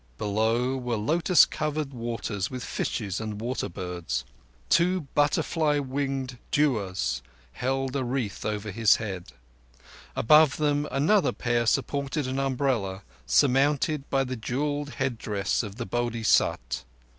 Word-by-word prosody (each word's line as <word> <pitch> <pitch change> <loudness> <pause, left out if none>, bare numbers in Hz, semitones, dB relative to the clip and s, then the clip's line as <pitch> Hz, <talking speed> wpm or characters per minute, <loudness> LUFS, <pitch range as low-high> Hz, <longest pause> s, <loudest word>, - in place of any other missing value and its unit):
Below 115 +5 +1
were 125 -2 -2
lotus 165 - +4
covered 150 -2 -3
waters 115 -4 -3
with 125 -2 -6
fishes 100 -3 -3
and 105 -1 -4
water 120 +4 -2
birds. 85 -8 -4 0.4
Two 180 - +3
butterfly 150 +1 +2
winged 135 -2 -2
devas 95 - 0 0.3
held 135 - -2
a 135 - 0
wreath 120 -5 -3
over 105 -1 -3
His 110 +1 +5
head; 95 - -6 0.8
above 150 +2 +5
them 145 -1 +1
another 150 +1 +3
pair 120 -1 0
supported 140 +3 0
an 130 +1 -2
umbrella 125 -8 -1 0.2
surmounted 140 +2 +2
by 135 0 +2
the 130 -1 -4
jewelled 145 +5 -2
headdress 110 -7 -1
of 105 -4 -7
the 120 0 -4
Bodhisat. 115 - +1
125 Hz, 120 wpm, -27 LUFS, 105-140 Hz, 0.8 s, His